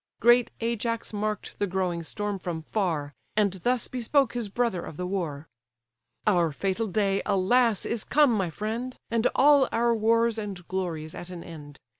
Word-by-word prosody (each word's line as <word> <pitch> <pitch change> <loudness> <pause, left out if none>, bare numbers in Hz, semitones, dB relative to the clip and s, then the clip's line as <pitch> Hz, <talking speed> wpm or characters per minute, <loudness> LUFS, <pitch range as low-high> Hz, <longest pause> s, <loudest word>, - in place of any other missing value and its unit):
Great 240 +1 +5
Ajax 230 0 -2
mark'd 210 0 -3
the 205 - +1
growing 180 -2 -1
storm 205 +4 -3
from 170 -3 -4
far, 155 -7 -1 0.2
And 205 -3 +3
thus 245 +1 +1
bespoke 255 +3 +1
his 235 -4 -3
brother 230 -4 0
of 150 - -8
the 180 - -3
war: 165 -6 -3 0.8
"Our 175 -6 +3
fatal 195 +8 -1
day, 195 0 +1
alas! 210 +3 +2
is 230 -2 -2
come, 295 -3 +4
my 190 -5 0
friend; 225 +9 -4
And 230 0 +3
all 285 -1 +6
our 235 0 +2
wars 230 +1 +2
and 195 -5 -6
glories 165 -5 -3
at 175 - -8
an 175 -2 -7
end! 145 -4 -10
205 Hz, 165 wpm, -27 LUFS, 180-230 Hz, 0.8 s, all